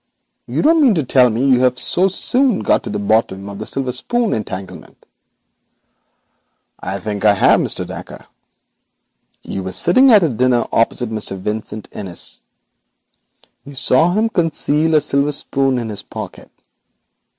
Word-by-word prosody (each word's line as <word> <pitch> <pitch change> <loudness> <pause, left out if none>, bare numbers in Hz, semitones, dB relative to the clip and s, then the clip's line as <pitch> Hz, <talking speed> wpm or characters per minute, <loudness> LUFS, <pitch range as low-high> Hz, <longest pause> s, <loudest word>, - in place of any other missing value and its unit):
You - - -2
don't 320 +2 +4
mean 255 -8 +4
to 160 - 0
tell 125 0 +4
me 120 +5 -1
you 130 -2 +4
have 125 0 +2
so 185 +2 +4
soon 245 +4 0
got - - +1
to - - -6
the 105 - -3
bottom 100 -2 0
of 100 0 -8
the 110 - -6
silver 135 -2 -3
spoon 235 - -1
entanglement?' 95 -3 -7 1.7
'I 95 +2 -5
think 105 0 -5
I 105 -1 +5
have, - - +4
Mr. - - -2
Dacre. - - -10 1.2
You 95 - -5
were 95 0 -5
sitting 250 - +4
at 170 - +4
dinner 125 -1 +2
opposite 115 0 0
Mr 105 -3 -4
Vincent 105 +2 -5
Innis. 95 -4 -4 1.2
You 140 0 -12
saw 135 +6 +2
him 215 +3 +1
conceal 160 -3 +1
a 155 - +4
silver 140 0 0
spoon 135 -2 0
in 115 -2 -4
his 105 - -6
pocket. - - -9
125 Hz, 150 wpm, -17 LUFS, 105-165 Hz, 1.7 s, I